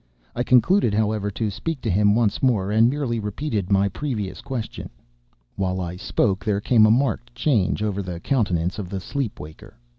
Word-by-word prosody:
I - - -1
concluded, 125 - +3
however, 105 -1 0
to 105 +1 -2
speak 160 - -4
to 110 - -2
him 105 +2 +3
once 110 -3 +1
more, 105 -7 +1
and 110 +2 +5
merely 130 -4 -2
repeated 105 -2 -3
my 100 0 +4
previous 105 -4 -4
question. 125 -5 -5 0.7
While 95 -1 -1
I 90 -1 -4
spoke, 95 +1 0
there 105 -3 0
came 110 0 +4
a - - +4
marked 120 0 0
change 120 -6 +1
over 100 -2 -1
the 90 -3 -6
countenance 90 -6 0
of 95 -4 -5
the 95 0 -3
sleep 130 +4 -4
waker. 75 +1 -12
105 Hz, 180 wpm, -23 LUFS, 95-120 Hz, 0.7 s, and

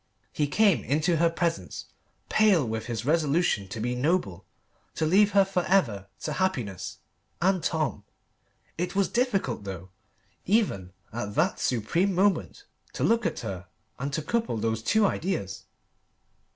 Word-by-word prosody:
He 150 - 0
came 185 - +3
into 155 +5 +1
her 170 +1 +4
presence 165 0 -2 0.4
pale 200 - +4
with 110 0 -4
his 115 -1 -4
resolution 150 - +1
to 110 - -6
be 120 +3 -1
noble, 125 - -1 0.5
to 160 - 0
leave 200 +5 +4
her 200 -1 +6
for 185 -2 -1
ever 115 - +1
to 150 - -3
happiness 130 - -2 0.4
and 185 -1 +2
Tom. 155 -11 -1 0.8
It 180 +2 -2
was 200 -1 +3
difficult 200 - 0
though, 95 -2 -7 0.6
even 180 - +1 0.2
at 105 -3 -4
that 175 +5 +1
supreme 165 - 0
moment, 195 +2 +1 0.3
to - - -3
look 230 -1 +3
at - - -4
her 100 -4 -6 0.3
and 140 +2 -3
to 155 - -1
couple 230 - -1
those 110 0 -1
two 215 - +3
ideas. 100 - -2
155 Hz, 145 wpm, -27 LUFS, -, 0.8 s, her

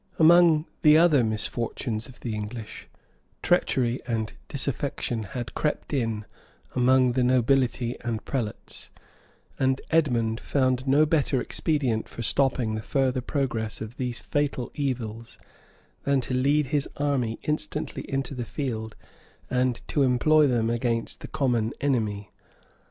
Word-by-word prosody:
Among 165 -1 +6 0.2
the 150 -1 +7
other 160 -6 +5
misfortunes 110 +1 -2
of 130 - -15
the 115 - -3
English, 105 +1 -6 0.6
treachery 125 -1 +2
and 110 -3 -2
disaffection 115 -2 -2
had 120 +2 -6
crept 150 0 -2
in 115 -6 -1 0.5
among 130 0 +4
the 125 +1 +1
nobility 125 -1 +2
and 115 -2 -3
prelates; 120 -6 -5 0.7
and 130 0 +2
Edmond 120 -8 +2
found 130 -1 0
no 145 +3 +5
better 145 -4 +1
expedient 130 -6 -1
for 115 - -6
stopping 125 -2 +1
the 110 - -3
further 130 0 0
progress 120 -5 -2
of 110 +3 -7
these 125 -3 -2
fatal 145 -4 -1
evils, 115 -5 -4 0.7
than 140 -1 +2
to 130 - -5
lead 140 +4 +2
his 145 -1 +1
army 135 -6 0
instantly 150 0 -2
into 135 0 -2
the 125 -2 -4
field, 110 -4 -4 0.6
and 125 -1 0
to 145 - +1
employ 145 +4 +4
them 115 -3 +1
against 115 -1 -1
the - - -8
common 125 -7 0
enemy. 110 -7 -1
125 Hz, 130 wpm, -26 LUFS, 115-140 Hz, 0.7 s, the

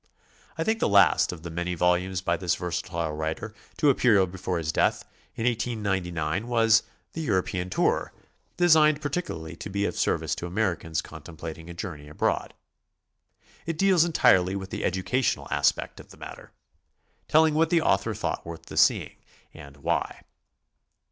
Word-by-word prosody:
I 160 - 0
think 220 +5 0
the - - +1
last 100 -1 +5
of 85 -3 -9
the 85 - -6
many 85 +2 -3
vol 90 +1 +3
umes 95 +1 -3
by 85 - +2
this 85 0 0
versatile 85 -2 -3
writer 80 +8 -4 0.2
to 150 -3 +4
appear 110 -7 +4
before 95 0 -4
his 80 -2 -2
death, - - +1 0.3
in 115 - -3
1899, 100 -6 -1
was 115 -2 +4 0.3
"The 165 - -4
European 95 - -1
Tour," - - 0 0.5
designed 155 -4 +5
particularly 110 - -4
to - - -7
be 100 +1 -1
of - - -2
service 80 -3 0
to 85 - -5
Americans 85 -5 -1
contemplating 80 0 -9
a 85 - -8
journey 80 -6 -7
abroad. 75 - -2 1.1
It 165 -1 -2
deals 190 -2 +4
entirely 95 - +3
with 95 -1 -6
the - - -4
educational 95 +8 0
aspect - - 0
of - - -13
the - - -15
matter, - - -10 0.8
telling 160 0 +4
what 160 +1 +2
the 170 -1 +3
author - - +1
thought - - -3
worth 85 -1 -9
the - - -9
seeing, - - +3 0.4
and 70 0 -12
why. 70 - -2
95 Hz, 160 wpm, -26 LUFS, 85-120 Hz, 1.1 s, last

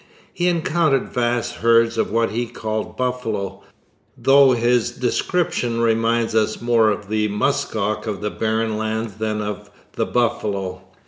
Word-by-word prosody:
He 175 0 0
encountered 160 -4 +1
vast 120 -1 -1
herds 115 0 +3
of 115 - 0
what 115 +1 +1
he 120 +2 -2
called 110 -1 -4
buffalo, 110 -7 -3 0.6
though 135 -1 +5
his 120 0 +2
description 125 -2 -1
reminds 115 0 +1
us 110 -1 +1
more 115 -2 +3
of 105 -1 -3
the 105 0 0
musk 105 +2 -1
ox 105 +1 -1
of 105 -2 -3
the 105 0 -3
barren 110 0 -1
lands 110 -1 -3
than 110 -1 -2
of 105 -2 -6 0.2
the - - -1
buffalo. 100 -6 -1
115 Hz, 145 wpm, -21 LUFS, 110-120 Hz, 0.6 s, though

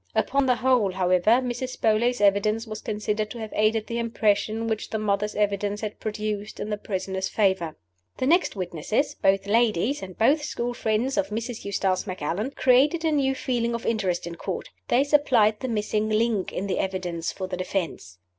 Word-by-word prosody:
Upon 275 -1 +2
the 250 - +4
whole, 245 -6 +2
however, 180 +1 +2
Mrs. 255 +1 -4
Beauly's 230 +2 +2
evidence 205 +3 +3
was 215 -1 -7
considered 210 0 -2
to 240 - -8
have 220 -2 -6
aided 215 0 +2
the 235 0 -3
impression 220 -1 0
which 220 -1 -2
the 220 - -2
mother's 210 0 -1
evidence 205 0 0
had 210 -1 -5
produced 210 -1 -4
in 215 - -4
the 210 - -1
prisoner's 190 -1 -3
favor. 190 -6 +1 0.4
The 255 - -1
next 340 +1 +3
witnesses 190 - -1
both 195 0 +2
ladies, 230 +4 +2
and 185 -2 -8
both 280 +7 +4
school 245 -4 -3
friends 235 +3 0
of 195 - +2
Mrs. 230 +2 -4
Eustace 195 -1 0
Macallan 185 - -2
created 285 +6 +3
a 320 - +3
new 270 -3 +2
feeling 235 -2 -1
of 235 - -6
interest 190 -7 0
in 170 - -5
Court. 180 +2 -5 0.2
They 255 +3 +4
supplied 255 -8 +3
the 260 - -3
missing 215 -1 -1
link 215 -2 +1
in 195 - -3
the 195 - -1
evidence 180 -3 -2
for 190 - -5
the 185 -1 -5
defense. 175 - -4
215 Hz, 185 wpm, -25 LUFS, 195-235 Hz, 0.4 s, the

